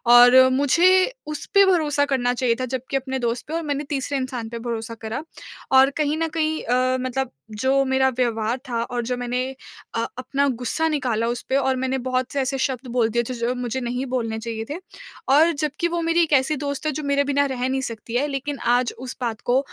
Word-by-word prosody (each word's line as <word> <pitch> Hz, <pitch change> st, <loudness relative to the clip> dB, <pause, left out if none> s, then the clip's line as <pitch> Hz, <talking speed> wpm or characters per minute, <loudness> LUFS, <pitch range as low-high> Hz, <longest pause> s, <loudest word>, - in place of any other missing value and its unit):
और 245 Hz, +1 st, +8 dB, 0.2 s
मुझे 285 Hz, +6 st, +3 dB, 0.4 s
उसपे 395 Hz, +6 st, +2 dB
भरोसा 300 Hz, -6 st, +2 dB
करना 250 Hz, -3 st, +1 dB
चाहिए 240 Hz, -2 st, +1 dB
था 255 Hz, -, -1 dB
जबकि 260 Hz, +2 st, -2 dB
अपने 265 Hz, 0 st, -3 dB
दोस्त 235 Hz, 0 st, -2 dB
पे 315 Hz, -, -6 dB
और 335 Hz, -, 0 dB
मैंने 290 Hz, -1 st, -2 dB
तीसरे 280 Hz, 0 st, -1 dB
इंसान 255 Hz, -4 st, -4 dB
पे 235 Hz, 0 st, -6 dB
भरोसा 230 Hz, -1 st, -4 dB
करा। 225 Hz, +7 st, -4 dB, 0.5 s
और 265 Hz, +1 st, +7 dB
कहीं 300 Hz, 0 st, +1 dB
न 325 Hz, 0 st, 0 dB
कहीं 315 Hz, 0 st, 0 dB
अ, 255 Hz, +2 st, +1 dB
मतलब 255 Hz, 0 st, -2 dB, 0.2 s
जो 265 Hz, +5 st, +2 dB
मेरा 265 Hz, 0 st, +2 dB
व्यवहार 230 Hz, -1 st, 0 dB
था 230 Hz, -1 st, -1 dB
और 240 Hz, -1 st, -3 dB
जो 250 Hz, 0 st, -2 dB
मैंने 245 Hz, +1 st, -1 dB, 0.5 s
अ, 230 Hz, 0 st, 0 dB
अपना 275 Hz, +2 st, 0 dB
गुस्सा 255 Hz, +6 st, -1 dB
निकाला 245 Hz, -6 st, 0 dB
उसपे 245 Hz, +2 st, -2 dB
और 265 Hz, -1 st, +2 dB
मैंने 260 Hz, +1 st, -1 dB
बहुत 255 Hz, 0 st, -1 dB
से 280 Hz, -, 0 dB
ऐसे 270 Hz, +1 st, -1 dB
शब्द 260 Hz, -1 st, -2 dB
बोल 235 Hz, -2 st, +2 dB
दिए 235 Hz, +2 st, +1 dB
थे, -, -, -2 dB
जो 235 Hz, +1 st, -1 dB
मुझे 250 Hz, +1 st, -3 dB
नहीं 245 Hz, +2 st, -2 dB
बोलने 230 Hz, -3 st, -2 dB
चाहिए 225 Hz, -1 st, -5 dB
थे। 295 Hz, -, -3 dB, 0.5 s
और 315 Hz, +5 st, +6 dB
जबकि 300 Hz, +3 st, -1 dB
वो 340 Hz, 0 st, -2 dB
मेरी 330 Hz, +1 st, +2 dB
एक 310 Hz, -, -1 dB
ऐसी 270 Hz, +3 st, +3 dB
दोस्त 285 Hz, +1 st, -4 dB
है 305 Hz, -, +1 dB
जो 305 Hz, +2 st, -5 dB
मेरे 280 Hz, 0 st, +2 dB
बिना 285 Hz, 0 st, +1 dB
रह 255 Hz, -2 st, -2 dB
नहीं 265 Hz, 0 st, -1 dB
सकती 230 Hz, -1 st, -6 dB
है 285 Hz, +4 st, +2 dB
लेकिन 275 Hz, 0 st, -3 dB, 0.2 s
आज 245 Hz, -1 st, 0 dB
उस 255 Hz, 0 st, -6 dB
बात 230 Hz, -3 st, -2 dB
को 250 Hz, +2 st, +3 dB
260 Hz, 215 wpm, -23 LUFS, 245-285 Hz, 0.5 s, और